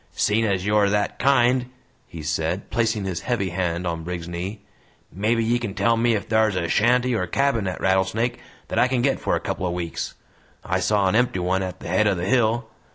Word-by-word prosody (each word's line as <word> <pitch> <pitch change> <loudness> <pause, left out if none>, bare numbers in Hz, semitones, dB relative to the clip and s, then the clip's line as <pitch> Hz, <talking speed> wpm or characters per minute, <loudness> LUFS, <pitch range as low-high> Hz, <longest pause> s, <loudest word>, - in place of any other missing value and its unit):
"Seein' 110 +2 +1
as 95 -3 0
you're 105 -1 +3
that 105 0 -1
kind," 125 -2 +3 0.4
he 80 -2 -9
said, 80 +4 -2
placing 110 -4 0
his 95 -3 -2
heavy 115 -6 -1
hand 85 0 -2
on 85 -1 -3
Briggs's 85 0 -5
knee, 90 +5 -5 0.5
"mebbe 110 +6 +1
ye 120 +2 +1
kin 110 -5 -5
tell 115 +4 +2
me 115 0 +2
ef 105 - -3
thar's 110 -3 +2
a 85 -2 -1
shanty 125 +7 +2
or 110 - 0
a 90 - -2
cabin 125 -2 +1
at 90 - -4
Rattlesnake 95 +5 +1 0.3
that - - 0
I 120 - +5
kin 125 -2 0
get 140 - +1
for - - 0
a - - 0
couple 90 - -3
o' - - -1
weeks. 85 -1 -4 0.5
I - - 0
saw 105 -2 +2
an 95 - +1
empty 120 -3 +2
one 90 +1 0
at 95 -1 -5
the - - -7
head 95 +5 +2
o' 100 - +2
the 85 0 -3
hill. 115 +1 +2
105 Hz, 220 wpm, -23 LUFS, 90-115 Hz, 0.5 s, I